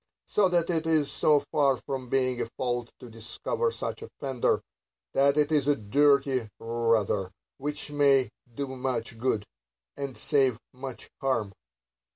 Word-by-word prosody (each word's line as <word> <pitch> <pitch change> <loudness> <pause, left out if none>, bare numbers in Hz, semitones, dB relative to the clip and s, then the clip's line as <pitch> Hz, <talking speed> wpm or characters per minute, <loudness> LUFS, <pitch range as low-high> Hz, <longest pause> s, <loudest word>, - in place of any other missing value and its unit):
So 200 -3 +3
that 175 -1 +2
it 165 -1 0
is 155 -3 +2
so 150 -2 +4
far 140 -3 +3
from 130 0 -5
being 130 -2 +1
a - - -2
fault 120 -2 -2
to 125 - -10
discover 115 - -2
such 455 - -4
offenders, 135 - -1 0.5
that 140 +1 +4
it 150 0 +3
is 145 -3 +2
a 145 - +4
duty 135 +1 +2
rather; 115 -4 +1 0.3
which 145 +1 -4
may 140 -5 +4 0.2
do 140 +5 -3
much 130 -2 -3
good, 110 -4 0 0.5
and 140 -2 -5
save 135 -4 +2
much 130 0 -8
harm. 115 -7 0
135 Hz, 145 wpm, -28 LUFS, 120-145 Hz, 0.5 s, so